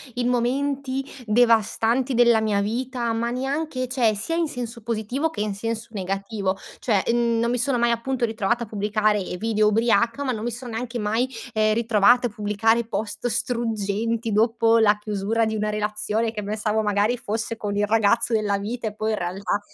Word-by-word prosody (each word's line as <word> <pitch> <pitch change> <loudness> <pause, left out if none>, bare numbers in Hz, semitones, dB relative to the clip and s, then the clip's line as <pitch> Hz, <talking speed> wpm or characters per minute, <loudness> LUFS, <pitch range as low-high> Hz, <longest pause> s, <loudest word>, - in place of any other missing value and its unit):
in 245 -1 0
momenti 265 +2 -1 0.2
devastanti 230 +3 +2
della 235 -2 +5
mia 210 -2 +1
vita, 235 +3 -2
ma 235 +1 -1
neanche 265 +1 -2
cioè 235 -4 +2
sia 215 +11 -3
in 335 -1 +1
senso 240 -4 -6
positivo 235 +7 -2
che 210 - -5
in 210 -1 -1
senso 225 +2 -4
negativo, 195 0 -2 0.2
cioè 210 -6 +1
mhmm 235 0 +2
non 235 +1 +1
mi 245 - 0
sono 250 +1 +1
mai 235 0 +2
appunto 240 +2 -1
ritrovata 220 +1 -1
a 230 - -7
pubblicare 210 0 +1 0.2
video 215 0 +1
ubriaca, 230 +4 +2
ma 260 - 0
non 220 -2 -4
mi 240 - -1
sono 240 +1 -7
neanche 235 +2 -4
mai, 225 +4 0 0.2
ehm, 215 -1 +3
ritrovata 235 +2 +4
a - - -8
pubblicare 220 +2 +1
post 220 +1 -3
struggenti 230 -1 -1
dopo 225 +1 +3
la 210 -1 +4
chiusura 210 +2 -1
di 220 0 -2
una 215 0 -1
relazione, 210 +1 -1
che 215 - -5
pensavo 215 +1 -1
magari 210 +3 +1
fosse 225 +1 -3
con 205 -2 -3
il 205 - +2
ragazzo 225 +2 +2
della 210 -2 +1
vita 220 +3 -4
e 210 - -5
poi 215 +1 -1
in 215 - -1
realtà 185 +3 -2
225 Hz, 180 wpm, -23 LUFS, 210-240 Hz, 0.2 s, della